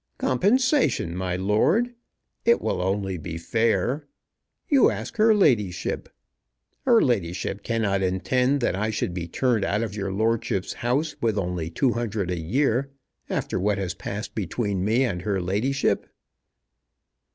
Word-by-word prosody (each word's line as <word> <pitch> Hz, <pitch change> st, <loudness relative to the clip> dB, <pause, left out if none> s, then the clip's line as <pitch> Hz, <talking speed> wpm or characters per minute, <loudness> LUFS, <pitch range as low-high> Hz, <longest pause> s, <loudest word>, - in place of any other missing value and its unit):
"Compensation, 230 Hz, -, +2 dB
my 90 Hz, -1 st, -2 dB
lord. 110 Hz, -, +2 dB, 0.5 s
It 235 Hz, +1 st, +4 dB
will 90 Hz, -, -1 dB
only 95 Hz, -1 st, -1 dB
be 80 Hz, 0 st, -5 dB
fair. 115 Hz, -, 0 dB, 0.6 s
You 275 Hz, -4 st, +5 dB
ask -, -, -5 dB
her 220 Hz, +1 st, +5 dB
ladyship. 105 Hz, -, +1 dB, 0.8 s
Her 240 Hz, -4 st, +5 dB
ladyship 95 Hz, -4 st, -1 dB
cannot 105 Hz, -4 st, 0 dB
intend 125 Hz, +9 st, +1 dB
that -, -, +1 dB
I 105 Hz, +3 st, -1 dB
should 105 Hz, -4 st, -2 dB
be 85 Hz, -1 st, -4 dB
turned 115 Hz, +4 st, +1 dB
out 105 Hz, +3 st, 0 dB
of 105 Hz, -3 st, -4 dB
your 100 Hz, -2 st, -3 dB
lordship's 110 Hz, -2 st, 0 dB
house 140 Hz, +6 st, 0 dB
with 110 Hz, -3 st, +1 dB
only 90 Hz, -4 st, -2 dB
two 125 Hz, -, +1 dB
hundred 110 Hz, -6 st, -2 dB
a 90 Hz, -, -2 dB
year, 125 Hz, -, +1 dB, 0.4 s
after -, -, -2 dB
what 100 Hz, +1 st, +1 dB
has 95 Hz, -3 st, -2 dB
passed 100 Hz, +3 st, -6 dB
between 100 Hz, -1 st, -2 dB
me 115 Hz, +6 st, +2 dB
and 90 Hz, -9 st, -1 dB
her 100 Hz, 0 st, -1 dB
ladyship." 105 Hz, +10 st, 0 dB
105 Hz, 140 wpm, -25 LUFS, 95-130 Hz, 0.8 s, You